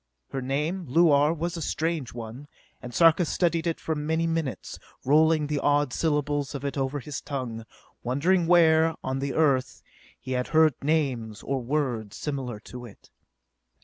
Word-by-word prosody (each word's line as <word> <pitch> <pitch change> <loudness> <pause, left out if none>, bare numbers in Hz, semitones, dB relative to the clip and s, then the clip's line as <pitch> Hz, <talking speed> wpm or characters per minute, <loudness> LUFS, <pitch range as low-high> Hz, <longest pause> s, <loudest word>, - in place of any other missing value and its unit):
Her 135 - -3
name, 150 +8 -2
Luar, 150 0 +4
was 170 +1 -3
a 165 - -5
strange 160 -4 -2
one, 120 +4 -8 0.3
and 125 - -8
Sarka 165 +7 +5
studied 170 0 0
it 165 - -1
for 160 - -2
many 160 +2 -1
minutes, 160 - -3 0.3
rolling 155 +2 +4
the 145 0 -1
odd 145 -2 +1
syllables 145 -2 -1
of 140 - -5
it 140 - -2
over 135 +1 -1
his 140 +2 -6
tongue, 125 -6 -5 0.4
wondering 165 +8 +1
where, 165 -2 +5
on 130 0 -2
the 140 0 -3
Earth, 135 -5 +1 0.4
he 130 - -8
had 125 -1 -1
heard 160 -1 +4
names, 130 -8 -1
or 135 -1 -2
words, 120 -6 -2
similar 130 -7 -4
to 125 +2 -10
it. 115 -4 -14
145 Hz, 160 wpm, -26 LUFS, 130-160 Hz, 0.4 s, Sarka